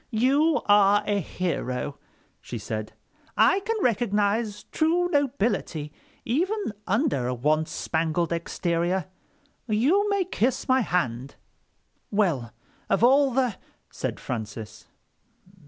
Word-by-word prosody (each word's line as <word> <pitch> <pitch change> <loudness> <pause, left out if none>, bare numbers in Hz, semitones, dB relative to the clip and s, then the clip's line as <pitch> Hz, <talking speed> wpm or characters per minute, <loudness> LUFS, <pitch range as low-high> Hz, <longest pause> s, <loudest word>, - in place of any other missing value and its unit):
"You 275 +7 +2
are 205 0 +5
a 205 -1 +1
hero," 145 -7 -3 0.4
she 120 - -6
said. 110 0 -5 0.4
"I 385 - +5
can 450 +3 -2
recognize 210 -2 0
true 340 +3 +2
nobility 240 - -1 0.3
even 360 - -1
under 205 - +1
a 125 - -1
once 155 +5 +1
spangled 165 +1 -1
exterior. 170 +1 -1 0.6
You 290 - +2
may 400 -2 +2
kiss 260 - -1
my 260 0 +4
hand." 135 - -2 0.7
"Well, 165 - 0 0.4
of 205 - +2
all 275 +3 +5
the...." 250 -4 0 0.3
said - - -4
Francis. 110 -2 -6
205 Hz, 105 wpm, -26 LUFS, 155-265 Hz, 0.7 s, are